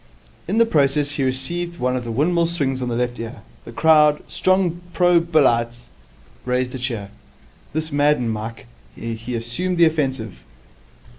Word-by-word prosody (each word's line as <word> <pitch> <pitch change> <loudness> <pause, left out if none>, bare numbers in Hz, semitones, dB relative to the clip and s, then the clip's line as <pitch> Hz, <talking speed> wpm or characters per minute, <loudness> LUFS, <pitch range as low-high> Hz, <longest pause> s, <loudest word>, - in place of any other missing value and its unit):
In 200 +5 -1
the 230 - +6
process 145 -6 +1
he 145 -1 -2
received 170 +7 -2
one 125 -2 0
of 125 - -2
the 115 - -4
windmill 165 +7 +2
swings 140 -6 -1
on 125 - -2
the 120 - -2
left 120 0 -2
ear. 115 0 -7 0.2
The - - -9
crowd, 150 -2 +4
strong 185 -2 +1
pro 175 -1 +4
Billites, 120 -8 +1 0.5
raised 125 0 -1
a 130 - -5
cheer. 115 -6 -4 0.6
This 155 +1 -2
maddened 145 -5 +2
Mike. 110 +1 -6 0.3
He 115 +1 -5
assumed 140 +11 -2
the 170 - +6
offensive. 135 - -1
135 Hz, 155 wpm, -21 LUFS, 120-165 Hz, 0.6 s, the